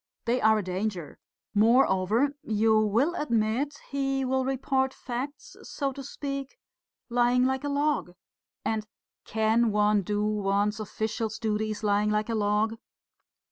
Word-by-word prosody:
"They 245 Hz, +2 st, +1 dB
are 220 Hz, 0 st, +5 dB
a 210 Hz, -, -1 dB
danger. 185 Hz, -2 st, -4 dB, 0.3 s
Moreover, 225 Hz, +2 st, +3 dB
you 220 Hz, -3 st, +2 dB
will 225 Hz, +10 st, +2 dB
admit 255 Hz, 0 st, 0 dB
he 270 Hz, -1 st, 0 dB
will 260 Hz, 0 st, 0 dB
report 265 Hz, 0 st, 0 dB
facts, 260 Hz, +4 st, -6 dB
so 275 Hz, -2 st, -3 dB
to 275 Hz, -, -7 dB
speak, 275 Hz, -, -5 dB, 0.5 s
lying 245 Hz, +1 st, +3 dB
like 265 Hz, +1 st, 0 dB
a 290 Hz, -, -2 dB
log. 285 Hz, -10 st, 0 dB, 0.5 s
And, 215 Hz, -1 st, -1 dB, 0.4 s
can 220 Hz, +2 st, +2 dB
one 210 Hz, 0 st, +3 dB
do 205 Hz, +2 st, -1 dB
one's 205 Hz, 0 st, 0 dB
official 220 Hz, +1 st, -3 dB
duties 215 Hz, -1 st, -2 dB
lying 205 Hz, 0 st, +2 dB
like 210 Hz, +1 st, 0 dB
a -, -, 0 dB
log? 215 Hz, +1 st, +1 dB
225 Hz, 135 wpm, -27 LUFS, 210-265 Hz, 0.5 s, are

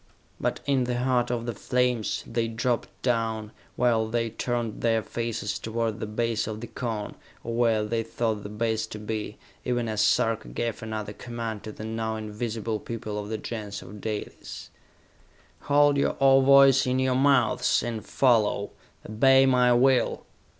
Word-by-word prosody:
But -, -, -1 dB
in 135 Hz, -3 st, +2 dB
the 120 Hz, 0 st, -1 dB
heart 125 Hz, -1 st, +1 dB
of 120 Hz, -1 st, -2 dB
the 120 Hz, -, -3 dB
flames, 125 Hz, +1 st, 0 dB
they 115 Hz, 0 st, -1 dB
dropped 115 Hz, +1 st, -1 dB
down, 115 Hz, -3 st, -1 dB, 0.2 s
while 115 Hz, -2 st, +2 dB
they 115 Hz, 0 st, -1 dB
turned 120 Hz, -1 st, -3 dB
their 115 Hz, -1 st, +2 dB
faces 115 Hz, -3 st, -3 dB
toward 115 Hz, -1 st, -2 dB
the 110 Hz, -, -4 dB
base 115 Hz, +1 st, -1 dB
of 110 Hz, -1 st, -5 dB
the 120 Hz, -, -6 dB
Cone, 115 Hz, -4 st, -4 dB, 0.3 s
or 115 Hz, -, -4 dB
where 115 Hz, -2 st, +2 dB
they 115 Hz, +1 st, -1 dB
thought 115 Hz, -1 st, -2 dB
the 100 Hz, -, -7 dB
base 110 Hz, +1 st, -1 dB
to 110 Hz, -, -7 dB
be, 105 Hz, 0 st, -4 dB, 0.3 s
even 120 Hz, -2 st, -1 dB
as 110 Hz, -1 st, 0 dB
Sarka 110 Hz, +1 st, +2 dB
gave 120 Hz, 0 st, -3 dB
another 110 Hz, -2 st, -5 dB
command 115 Hz, -2 st, -5 dB
to 110 Hz, -, -5 dB
the 110 Hz, -, -8 dB
now 110 Hz, 0 st, -2 dB
invisible 110 Hz, 0 st, -3 dB
people 110 Hz, -2 st, -5 dB
of 105 Hz, 0 st, -6 dB
the 110 Hz, -, -2 dB
Gens 105 Hz, -2 st, -6 dB
of 105 Hz, 0 st, -11 dB
Dalis. 105 Hz, -1 st, -6 dB, 1.0 s
"Hold 145 Hz, 0 st, +5 dB
your 140 Hz, -, +1 dB
ovoids 135 Hz, 0 st, +6 dB
in 125 Hz, 0 st, +1 dB
your 130 Hz, 0 st, +2 dB
mouths 135 Hz, -2 st, +3 dB
and 115 Hz, -2 st, -4 dB
follow! 110 Hz, -6 st, +2 dB, 0.4 s
Obey 135 Hz, +5 st, +5 dB
my 125 Hz, -2 st, +4 dB
will!" 125 Hz, +1 st, +3 dB
115 Hz, 165 wpm, -26 LUFS, 110-125 Hz, 1.0 s, ovoids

